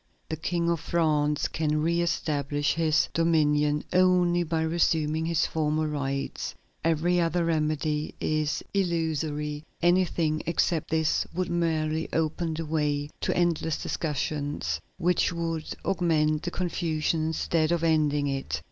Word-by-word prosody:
The 160 - -1
King 170 +2 -1
of 170 - 0
France 150 -3 +1
can 155 -1 0
re 170 +1 +2
establish 145 -4 0
his 160 -1 +2
dominion 150 -3 +2
only 180 -1 +4
by 165 -1 0
resuming 160 -1 +1
his 165 -2 +2
former 155 0 0
rights; 140 -2 -3 0.3
every 165 +2 +2
other 170 +1 +1
remedy 155 -1 -1
is 155 -1 -1
illusory; 155 -5 -1 0.2
anything 170 -3 +2
except 165 -1 +1
this 160 -1 +1
would 180 0 -1
merely 160 -2 0
open 160 +1 0
the 165 +1 -4
way 150 -1 -1
to - - -1
endless 170 -2 +1
discussions 145 - -2 0.2
which 180 0 +2
would 165 -2 -3 0.2
augment 155 -5 +2
the 175 - -3
confusion 165 -3 -1
instead 160 0 0
of 170 -1 +1
ending 150 -3 +2
it. 135 -1 -2
160 Hz, 130 wpm, -27 LUFS, 150-170 Hz, 0.3 s, only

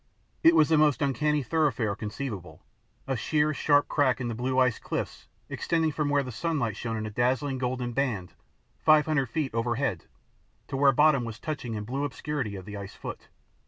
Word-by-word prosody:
It 165 +1 +7
was 155 -1 +5
the 160 -2 +4
most 150 -1 +3
uncanny 150 +1 +1
thoroughfare 125 -7 +1
conceivable 105 -4 -6 0.4
a 135 - -1
sheer, 150 +6 +1
sharp 145 0 +3
crack 135 -4 +2
in 120 -2 -2
the - - -2
blue 125 +3 -2
ice 125 -3 +3
cliffs - - -4 0.2
extending 165 -2 0
from 150 0 -1
where 145 -1 +2
the 130 - -6
sunlight 120 - -1
shone 115 0 -3
in 110 - -3
a 110 - -5
dazzling 130 +4 0
golden 125 -1 -2
band 115 -9 -1 0.5
five 155 -1 +5
hundred 140 -5 0
feet 145 -1 -2
overhead 115 - -1 0.6
to - - -3
where 135 0 +5
bottom 145 -1 +4
was 115 -2 -6
touched 155 +1 -5
in 110 -3 -4
blue 135 +6 -3
obscurity 140 -5 -3
of 95 -2 -8
the 105 0 -7
ice 100 -1 -8
foot. - - -8
130 Hz, 190 wpm, -28 LUFS, 115-150 Hz, 0.6 s, It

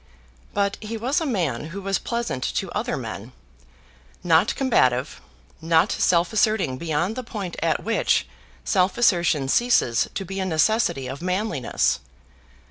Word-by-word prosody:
But 200 -1 0
he 225 +1 -5
was 255 +8 0
a 320 - -1
man 165 - -1
who 170 +5 -7
was 195 0 0
pleasant 235 - -3
to - - -2
other - - -2
men, - - -7 0.9
not 175 +3 +3
combative, 130 - +1 0.4
not 165 +3 +3
self 170 0 +2
asserting 205 -11 +1
beyond 170 +5 -1
the 255 - -3
point 205 -7 -6
at 160 -3 0
which 225 +2 +1 0.4
self 185 0 +2
assertion 170 - +2
ceases 135 - +2
to 195 - -3
be 195 +2 -5
a 190 - -1
necessity 165 - +1
of 135 +3 -6
manliness. 180 - 0
185 Hz, 140 wpm, -23 LUFS, 160-220 Hz, 0.9 s, not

